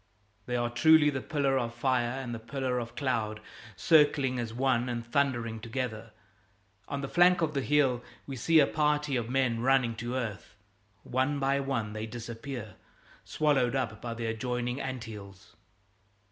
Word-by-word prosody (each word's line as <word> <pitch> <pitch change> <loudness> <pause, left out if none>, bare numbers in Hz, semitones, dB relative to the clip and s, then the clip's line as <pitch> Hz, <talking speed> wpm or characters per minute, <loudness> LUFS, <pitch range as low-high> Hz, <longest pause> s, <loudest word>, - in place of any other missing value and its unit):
They 125 - -1
are 120 0 0
truly 155 +3 +5
the 135 -2 -3
pillar 135 -2 +1
of 120 -1 -3
fire 120 -1 +1
and 125 -3 -5
the 115 - -5
pillar 125 +2 -2
of 120 -1 -7
cloud, 110 -6 -1 0.4
circling 145 -5 +3
as 115 -2 -3
one 125 0 +1
and 120 -1 -3
thundering 120 -3 0
together. 115 -1 -4 0.8
On 140 - -3
the 135 - -3
flank 175 +2 +4
of 155 -1 0
the 140 - 0
hill 135 -3 +2 0.2
we 135 - -6
see 160 +7 +4
a 145 - +6
party 150 -1 0
of 120 -2 -2
men 130 -3 +1
running 125 -2 +2
to 120 +2 -4
earth. 110 -7 -5 0.5
One 130 +3 0
by 140 0 +1
one 130 -6 -2
they 110 +1 -4
disappear, 115 -1 -7 0.5
swallowed 135 -5 +1
up 115 -5 -2
in 115 -1 -4
the 115 0 -4
adjoining 125 +3 -2
anthills. 110 -6 -8
125 Hz, 160 wpm, -29 LUFS, 115-140 Hz, 0.8 s, a